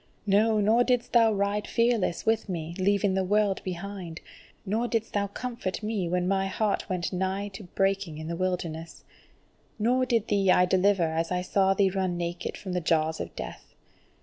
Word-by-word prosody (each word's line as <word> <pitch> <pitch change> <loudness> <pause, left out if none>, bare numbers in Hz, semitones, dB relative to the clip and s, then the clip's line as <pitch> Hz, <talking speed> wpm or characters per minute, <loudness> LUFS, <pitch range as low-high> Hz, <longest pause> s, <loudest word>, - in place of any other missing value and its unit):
No, 215 +2 +3
nor 220 +4 +4
didst 245 -1 0
thou 230 -2 +6
ride 200 0 -1
fearless 230 -6 +1
with 225 -1 +1
me, 165 -2 -4
leaving 200 +1 +2
the 190 0 +1
world 205 0 +1
behind; 185 -2 -6 0.5
nor 220 +5 0
didst 225 -2 -2
thou 200 -1 +1
comfort 230 -2 -5
me 210 -5 -1
when 180 0 0
my 195 0 +1
heart 205 +1 -1
went 180 0 -2
nigh 190 +2 -1
to 200 0 -10
breaking 195 -3 -1
in 155 0 -6
the 170 - -3
wilderness! 170 -3 -3 0.7
Nor 250 +4 +2
thee 235 - +3
did 200 -3 +1
I 180 0 +6
deliver 190 0 +3
as 165 +1 -1
I 180 0 0
saw 195 +1 +2
thee 195 -1 +3
running 185 -2 -1
naked 175 0 -4
from 185 -2 -6
the 180 - 0
jaws 160 -1 +1
of - - -6
death. - - -8
195 Hz, 180 wpm, -27 LUFS, 180-210 Hz, 0.7 s, thou